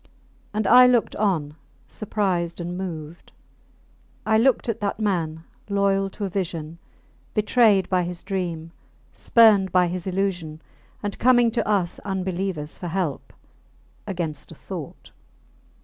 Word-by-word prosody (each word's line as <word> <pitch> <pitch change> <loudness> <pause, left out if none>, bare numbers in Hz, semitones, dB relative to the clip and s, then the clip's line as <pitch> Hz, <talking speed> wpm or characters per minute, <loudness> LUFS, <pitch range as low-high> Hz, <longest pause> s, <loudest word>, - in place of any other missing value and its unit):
And 215 0 -1
I 250 +5 +8
looked 245 -2 +2
on, 165 -8 0 0.3
surprised 185 -5 -2
and 175 +1 -4
moved; 170 -3 -7 0.9
I 220 - +2
looked 245 +3 +3
at 230 - -2
that 205 +1 -2
man, 165 -6 -1 0.3
loyal 195 -1 +1
to 205 +1 -5
a - - -3
vision, 170 -4 -4 0.6
betrayed 215 -3 +3
by 185 -1 +1
his 175 0 -5
dream, 175 -4 -4 0.4
spurned 210 -5 +4
by 180 -1 +4
his 175 +1 -4
illusion, 180 -5 -2 0.4
and 205 -1 -4
coming 245 -1 +4
to 235 - -1
us 195 -5 0
unbelievers 185 -5 -3
for 180 - -5
help 170 -5 -3 0.8
against 170 -7 -4
a - - -10
thought. - - -9
190 Hz, 130 wpm, -23 LUFS, 170-205 Hz, 0.9 s, I